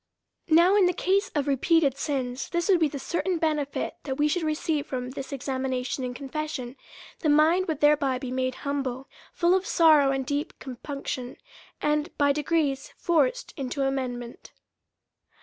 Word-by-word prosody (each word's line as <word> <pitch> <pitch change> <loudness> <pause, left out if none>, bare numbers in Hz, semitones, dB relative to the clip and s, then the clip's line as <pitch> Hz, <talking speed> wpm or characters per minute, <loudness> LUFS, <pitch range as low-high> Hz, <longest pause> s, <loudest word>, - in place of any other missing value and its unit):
Now 340 +5 +6
in 395 -3 +5
the 360 - +1
case 390 +2 +1
of 290 -1 0
repeated 280 +1 +3
sins, 265 -3 -3
this 345 0 -1
would 370 -3 +5
be 320 - +4
the 285 - -6
certain 345 +5 -1
benefit 300 -3 -1
that 265 -2 -4
we 295 +2 +2
should 340 +4 0
receive 310 -1 -1
from 250 -1 -4
this 270 +1 -7
exam 265 -1 -3
ination 260 0 -2
and 250 -1 -4
confession; 275 -2 -5 0.4
the 310 - 0
mind 320 +5 +4
would 315 -4 -3
thereby 295 -3 +3
be 255 0 -6
made 255 0 -1
humble, 270 -2 -2 0.2
full 345 0 +2
of 380 +1 +1
sorrow 310 -4 +5
and 270 -1 -1
deep 290 +1 -3
compunction, 260 -1 -6 0.5
and 300 +2 0
by 285 -1 +4
degrees 295 -2 -1
forced - - +1
into 275 0 -3
amendment. 250 -3 -4
285 Hz, 165 wpm, -26 LUFS, 265-320 Hz, 0.5 s, Now